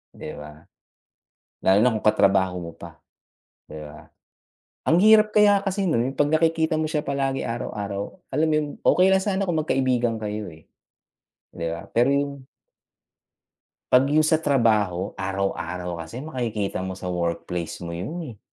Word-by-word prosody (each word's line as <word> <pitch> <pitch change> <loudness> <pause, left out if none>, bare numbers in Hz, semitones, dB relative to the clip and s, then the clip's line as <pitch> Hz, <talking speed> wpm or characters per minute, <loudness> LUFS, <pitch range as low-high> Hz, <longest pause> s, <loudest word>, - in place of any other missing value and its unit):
'di - - -7
ba? 75 +1 -12 1.0
Lalo 95 +1 +4
na 120 +3 +4
kung 110 - -3
ka-trabaho 95 -3 +3
mo 85 -1 -7
pa, - - -12 0.7
'di 75 0 -9
ba? 75 -1 -12 0.8
Ang 165 - +4
hirap 215 0 +6
kaya 205 -1 +6
kasi 195 -1 0
no'n, 130 -1 0
yung - - -24
'pag 145 0 +3
nakikita 160 -1 +1
mo 155 - 0
siya 155 -1 -1
palagi 135 -2 -1
araw-araw. 105 - -5
Alam 160 - +1
mo 155 - +1
yon, 155 -1 +1 0.2
okey 185 - +5
lang 190 0 +3
sana 195 -1 -1
kung 170 -3 0
mag-kaibigan 130 -6 +1
kayo, 105 0 -4
eh, 80 - -21 0.8
'di 85 - -5
ba? 85 - -9
Pero 120 +4 +2
yung 140 -1 -2 1.5
Pag 125 +1 +6
yong 155 +1 +4
sa 160 - +4
trabaho, 110 - +1
araw-araw 90 -3 -3
kasi 80 +10 -8
makikita 115 -10 -3
mo 95 - -4
sa 95 0 -7
workplace 85 -1 -3
mo 85 -1 -6
yun, 105 - -5 0.2
eh. - - -28
120 Hz, 160 wpm, -24 LUFS, 95-155 Hz, 1.5 s, hirap